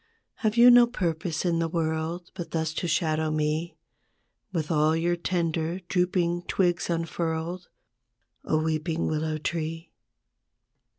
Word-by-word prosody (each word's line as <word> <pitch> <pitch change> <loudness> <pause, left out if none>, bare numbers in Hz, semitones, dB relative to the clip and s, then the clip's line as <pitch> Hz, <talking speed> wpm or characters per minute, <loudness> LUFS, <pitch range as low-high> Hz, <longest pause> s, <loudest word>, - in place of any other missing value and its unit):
Have 215 0 0
you 245 +1 +9
no 240 0 +8
purpose 170 -7 -2
in 170 -2 +1
the 165 - +1
world 165 +1 -2
But 175 -3 -6
thus 160 -1 -1
to 175 - -2
shadow 155 -1 +1
me 155 +2 -1 0.7
With 165 -3 -2
all 155 0 +3
your 170 +2 +1
tender 170 -1 -1
drooping 175 -1 +1
twigs 175 -2 +1
unfurled, 165 +1 -2 0.7
O 155 - +1
weeping 160 +1 -1
willow 155 0 -1
tree? 165 +1 -4
165 Hz, 125 wpm, -27 LUFS, 160-175 Hz, 0.7 s, you